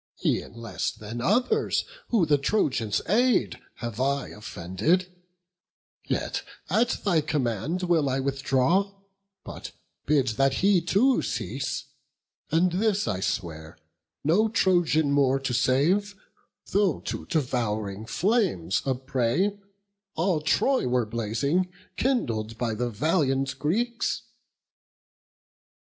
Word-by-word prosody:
E'en -, -, 0 dB
less 115 Hz, -5 st, -3 dB
than 115 Hz, +2 st, -7 dB
others 250 Hz, -, +1 dB, 0.2 s
who 215 Hz, -8 st, +3 dB
the 145 Hz, -2 st, +3 dB
Trojans 135 Hz, -, 0 dB
aid, 240 Hz, +5 st, +2 dB, 0.2 s
Have 115 Hz, -2 st, -6 dB
I 140 Hz, +1 st, 0 dB
offended; 130 Hz, -, -1 dB, 0.9 s
yet -, -, -1 dB, 0.3 s
at 235 Hz, +2 st, +2 dB
thy 175 Hz, -6 st, +3 dB
command 145 Hz, -, -1 dB
Will 165 Hz, -5 st, +2 dB
I 130 Hz, +1 st, 0 dB
withdraw; 140 Hz, +8 st, +1 dB, 0.5 s
but -, -, -8 dB, 0.4 s
bid 140 Hz, -4 st, +3 dB
that 135 Hz, +4 st, +2 dB
he 200 Hz, -3 st, +5 dB
too 225 Hz, +10 st, +3 dB
cease; -, -, -3 dB, 0.6 s
And 175 Hz, +3 st, +3 dB
this 205 Hz, +2 st, +1 dB
I 95 Hz, -, -1 dB
swear, 85 Hz, -5 st, -4 dB, 0.5 s
no 200 Hz, +9 st, +3 dB
Trojan 175 Hz, -8 st, +2 dB
more 135 Hz, -1 st, +3 dB
to 135 Hz, -2 st, -2 dB
save, 160 Hz, -, +2 dB, 0.6 s
Though 200 Hz, -2 st, +2 dB
to -, -, -5 dB
devouring 110 Hz, -7 st, -2 dB
flames 185 Hz, -, +1 dB
a 130 Hz, -, +2 dB
prey, 130 Hz, -, 0 dB, 0.6 s
all 165 Hz, -1 st, +1 dB
Troy 260 Hz, -, +2 dB
Were 125 Hz, -1 st, +1 dB
blazing, 120 Hz, -, -1 dB, 0.2 s
kindled 115 Hz, -, -1 dB
by 115 Hz, -2 st, -1 dB
the 120 Hz, +3 st, -2 dB
valiant 135 Hz, -, 0 dB
Greeks." 235 Hz, +10 st, -1 dB
140 Hz, 110 wpm, -26 LUFS, 120-190 Hz, 0.9 s, he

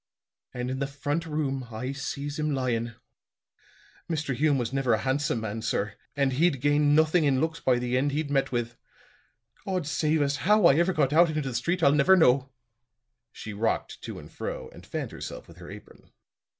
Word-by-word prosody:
And 125 Hz, 0 st, -4 dB
in 130 Hz, -, -3 dB
the 140 Hz, -, -1 dB
front 145 Hz, +4 st, -3 dB
room 135 Hz, -4 st, -2 dB
I 125 Hz, +4 st, -4 dB
sees 140 Hz, +1 st, -5 dB
him 150 Hz, -1 st, 0 dB
lyin'. 120 Hz, -3 st, -1 dB, 1.1 s
Mr. 150 Hz, -4 st, -1 dB
Hume 145 Hz, +1 st, +2 dB
was 120 Hz, 0 st, -2 dB
never 135 Hz, -3 st, +1 dB
a 110 Hz, -, -4 dB
handsome 130 Hz, -1 st, 0 dB
man, 110 Hz, 0 st, -4 dB
sir; 105 Hz, -2 st, -1 dB, 0.2 s
and 140 Hz, -2 st, +1 dB
he'd 150 Hz, 0 st, +2 dB
gained 145 Hz, +1 st, +3 dB
nothing 160 Hz, +2 st, +4 dB
in 135 Hz, -3 st, +2 dB
looks 160 Hz, +2 st, -1 dB
by 130 Hz, -2 st, +2 dB
the 125 Hz, 0 st, -1 dB
end 145 Hz, +2 st, 0 dB
he'd 145 Hz, 0 st, -2 dB
met 135 Hz, -1 st, +1 dB
with. 120 Hz, -1 st, -3 dB, 0.9 s
God 185 Hz, -4 st, -2 dB
save 155 Hz, 0 st, +1 dB
us, 140 Hz, 0 st, 0 dB
how 210 Hz, 0 st, +3 dB
I 155 Hz, -, +8 dB
ever 175 Hz, +3 st, +3 dB
got 140 Hz, -5 st, +1 dB
out 170 Hz, +2 st, +6 dB
into 155 Hz, 0 st, -1 dB
the 130 Hz, -, -4 dB
street, 170 Hz, +9 st, -1 dB
I'll 140 Hz, -, +6 dB
never 150 Hz, +6 st, +5 dB
know." 135 Hz, -4 st, +4 dB, 0.8 s
She 110 Hz, -, -8 dB
rocked 110 Hz, +2 st, -2 dB
to -, -, -7 dB
and -, -, -11 dB
fro -, -, -6 dB
and -, -, -14 dB
fanned -, -, -4 dB
herself -, -, -8 dB
with -, -, -15 dB
her -, -, -11 dB
apron. -, -, -13 dB
140 Hz, 195 wpm, -27 LUFS, 125-155 Hz, 1.1 s, I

